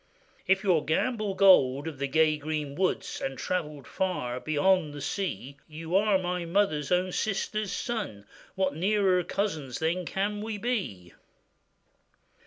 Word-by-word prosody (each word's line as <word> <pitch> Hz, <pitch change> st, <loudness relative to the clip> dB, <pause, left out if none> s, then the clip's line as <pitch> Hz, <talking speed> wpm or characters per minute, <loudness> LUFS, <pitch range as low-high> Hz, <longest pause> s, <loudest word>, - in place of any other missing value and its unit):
'If 190 Hz, +1 st, +3 dB
you 190 Hz, -4 st, +4 dB
are 155 Hz, -, +2 dB
Gamble 205 Hz, -, -1 dB
Gold 145 Hz, -8 st, +5 dB
of 150 Hz, -5 st, -6 dB
the 140 Hz, -, -1 dB
gay 155 Hz, +2 st, +3 dB
green 150 Hz, -1 st, -4 dB
woods, 185 Hz, +5 st, -1 dB
And 135 Hz, 0 st, -3 dB
travellèd 150 Hz, -6 st, -3 dB
far 125 Hz, -10 st, -2 dB
beyond 155 Hz, +2 st, +1 dB
the -, -, -6 dB
sea, 145 Hz, -5 st, -4 dB
You 160 Hz, +2 st, -5 dB
are 205 Hz, 0 st, +4 dB
my 180 Hz, -1 st, -2 dB
mother's 170 Hz, -4 st, 0 dB
own 180 Hz, +1 st, +2 dB
sister's 215 Hz, +1 st, -2 dB
son; 205 Hz, -, -4 dB, 0.3 s
What 190 Hz, -5 st, 0 dB
nearer 190 Hz, +1 st, +2 dB
cousins 160 Hz, -, -2 dB
then 170 Hz, +2 st, -1 dB
can 205 Hz, +2 st, -2 dB
we 215 Hz, 0 st, -4 dB
be? 190 Hz, -, -3 dB
180 Hz, 145 wpm, -28 LUFS, 150-195 Hz, 0.3 s, Gold